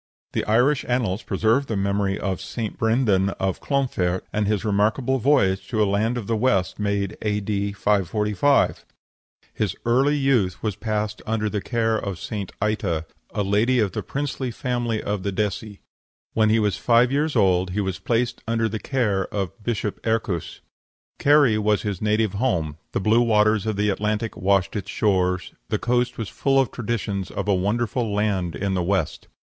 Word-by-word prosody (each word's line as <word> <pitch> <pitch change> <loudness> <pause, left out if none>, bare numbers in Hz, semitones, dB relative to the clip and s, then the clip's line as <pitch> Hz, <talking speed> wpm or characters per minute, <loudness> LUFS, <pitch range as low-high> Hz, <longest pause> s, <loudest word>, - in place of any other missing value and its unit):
The - - 0
Irish 125 +6 +3
annals 120 -5 0
preserve 115 +6 +1
the 110 - -2
memory 100 0 0
of 95 -3 -2
St. 110 -3 -4
Brendan 110 -4 +2
of 95 -1 -1
Clonfert, 95 -11 0
and 105 -1 0
his 105 0 0
remarkable 110 +6 +1
voyage 120 -8 +2
to 110 -3 +1
a - - +3
land 105 +5 0
in 115 - -4
the 115 - 0
West, 105 -7 +1
made 100 0 -1
A.D. 105 -1 -1
545. 105 +6 +1 0.7
His 100 -3 -1
early 135 +5 +3
youth 115 - +1
was 105 -3 -1
passed 105 -1 -2
under 110 -1 0
the 105 - -2
care 115 0 0
of 100 -3 -4
St. 100 0 -5
Ita, 100 -7 -1 0.2
a 105 0 -2
lady 105 +6 +2
of 105 -5 +2
the 110 - -3
princely 135 +5 -3
family 120 -2 -2
of 105 -1 -2
the 100 - -2
Desii. 105 +1 -3 0.5
When 110 -1 +3
he 110 - +4
was 105 -3 +1
five 120 +1 +4
years 150 +2 0
old 90 -1 +3
he 95 +3 -2
was 95 -2 -2
placed 115 +4 -1
under 115 0 +1
the 110 0 -4
care 105 -5 0
of 95 -3 -3
Bishop 105 -3 -3
Ercus. 110 -7 -2 0.6
Kerry 140 -7 +5
was 105 -1 +1
his 100 -4 -3
native 105 -1 +1
home; 85 - -1
the - - 0
blue 110 +4 +3
waves 110 -2 +3
of 110 - 0
the 105 +1 +1
Atlantic 105 +3 -2
washed 95 0 +1
its 105 - -4
shores; 90 -3 0 0.2
the - - +1
coast 125 +1 0
was 115 - -3
full 135 +5 +1
of 135 - +1
traditions 105 -4 -3
of - - -4
a 100 - +3
wonderful 110 +4 0
land 100 -4 0
in 100 0 -1
the 90 - 0
West. 95 +2 -1
105 Hz, 175 wpm, -23 LUFS, 100-115 Hz, 0.7 s, Kerry